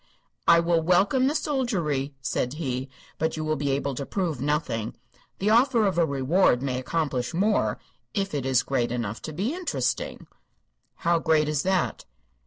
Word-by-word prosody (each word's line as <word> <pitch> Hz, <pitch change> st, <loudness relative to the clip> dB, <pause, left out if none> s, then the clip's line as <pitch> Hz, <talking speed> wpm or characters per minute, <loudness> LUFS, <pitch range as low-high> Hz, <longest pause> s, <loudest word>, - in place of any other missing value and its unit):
"I 170 Hz, -, +7 dB
will 170 Hz, 0 st, +2 dB
welcome 195 Hz, +10 st, +3 dB
the 295 Hz, -, 0 dB
soldiery," 175 Hz, -, -1 dB
said 130 Hz, -1 st, -1 dB
he; 135 Hz, -4 st, -3 dB, 0.3 s
"but 160 Hz, 0 st, 0 dB
you 155 Hz, -, -3 dB
will 155 Hz, 0 st, +1 dB
be 140 Hz, 0 st, -2 dB
able 140 Hz, 0 st, 0 dB
to 140 Hz, -, -4 dB
prove 165 Hz, -4 st, -2 dB
nothing. 140 Hz, -7 st, -1 dB, 0.4 s
The 205 Hz, +3 st, +1 dB
offer 235 Hz, -1 st, +4 dB
of 185 Hz, -4 st, +1 dB
a 165 Hz, -, +3 dB
reward 140 Hz, 0 st, +2 dB
may 130 Hz, -2 st, -1 dB
accomplish 140 Hz, -1 st, -2 dB
more 205 Hz, +4 st, +2 dB, 0.4 s
if 195 Hz, -3 st, -1 dB
it 140 Hz, -3 st, -1 dB
is 130 Hz, -2 st, +2 dB
great 125 Hz, -4 st, 0 dB
enough 115 Hz, -3 st, -3 dB
to 155 Hz, -, -6 dB
be 195 Hz, -, -2 dB
interesting." 360 Hz, 0 st, -2 dB, 0.7 s
"How 170 Hz, 0 st, +1 dB
great 155 Hz, -2 st, +2 dB
is 150 Hz, -2 st, 0 dB
that?" 190 Hz, +1 st, 0 dB
155 Hz, 170 wpm, -26 LUFS, 135-190 Hz, 0.7 s, I